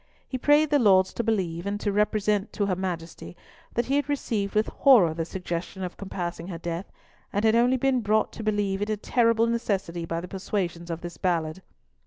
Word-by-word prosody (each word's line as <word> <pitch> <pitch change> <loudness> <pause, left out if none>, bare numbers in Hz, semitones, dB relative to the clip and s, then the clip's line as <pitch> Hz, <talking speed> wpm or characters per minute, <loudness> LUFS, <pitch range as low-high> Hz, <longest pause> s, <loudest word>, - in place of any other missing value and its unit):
He - - -5
prayed 295 +3 +4
the 290 - +4
Lords 190 -5 +4
to 235 - -2
believe, 185 -5 -1
and 205 +1 -2
to 205 - -1
represent 210 0 +1
to 205 - 0
her 190 -2 0
Majesty, 175 -2 -5 0.4
that 235 - +1
he 275 +2 +1
had 290 0 -1
received 220 -8 -2
with 215 +1 +3
horror 225 - +5
the 165 0 -3
suggestion 180 +1 -5
of 180 - -5
compassing 175 -3 -5
her 175 -3 -5
death, 170 +2 -5 0.4
and 205 +2 0
had 220 - +5
only 245 +2 +4
been 260 -1 +1
brought 215 0 +1
to 225 - -7
believe 205 -2 0
it 205 - -1
a 215 - 0
terrible 230 +1 +2
necessity 195 -7 -1
by 165 0 -2
the 175 - -7
persuasions 180 -3 -3
of 165 0 -4
this 175 -3 -7
Ballard. 165 -1 -1
200 Hz, 205 wpm, -26 LUFS, 175-225 Hz, 0.4 s, horror